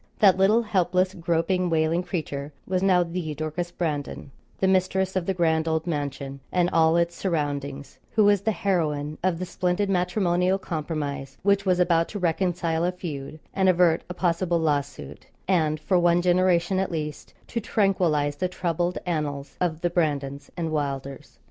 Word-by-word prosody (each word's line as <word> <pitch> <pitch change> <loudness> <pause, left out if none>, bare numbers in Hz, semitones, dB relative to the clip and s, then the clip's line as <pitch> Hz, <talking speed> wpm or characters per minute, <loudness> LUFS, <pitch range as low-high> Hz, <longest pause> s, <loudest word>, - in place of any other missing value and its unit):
That 195 -3 +6
little 205 +5 +4
helpless, 185 -2 +1
groping, 175 +1 0
wailing 160 +1 +2
creature 150 -5 -4
was 185 -1 -1
now 185 -2 +4
the 170 -3 -4
Dorcas 155 +3 -3
Brandon, 150 -5 -4 0.3
the 190 - +2
mistress 190 0 +1
of 185 -2 -1
the 195 - +1
grand 160 -2 +1
old 160 0 0
mansion 140 -4 -4
and 180 -1 +2
all 165 0 +4
its 170 0 +1
surroundings, 145 -6 -3
who 215 - +4
was 205 -1 +4
the 220 +2 +1
heroine 155 -6 -1
of 185 -2 +1
the 185 - -3
splendid 185 +2 -1
matrimonial 180 0 +1
compromise 150 -6 -4
which 200 0 +2
was 180 -1 +3
about 170 -2 +3
to 210 - -5
reconcile 170 -2 0
a 180 - +1
feud, 155 -4 -7
and 190 -1 +3
avert 175 -2 +3
a 180 - -5
possible 175 -1 +1
lawsuit, 145 - -2 0.2
and, 155 -5 +2
for 185 +3 +2
one 175 0 +3
generation, 180 0 +3
at 190 - -1
least, 150 -2 -5
to 235 - -2
tranquillise 175 -9 +1
the 185 - 0
troubled 175 0 -1
annals 150 -5 -3
of 165 -3 -1
the 175 - +1
Brandons 145 -5 -1
and 165 -2 -2
Wylders. 140 -3 -4
170 Hz, 165 wpm, -25 LUFS, 155-185 Hz, 0.3 s, That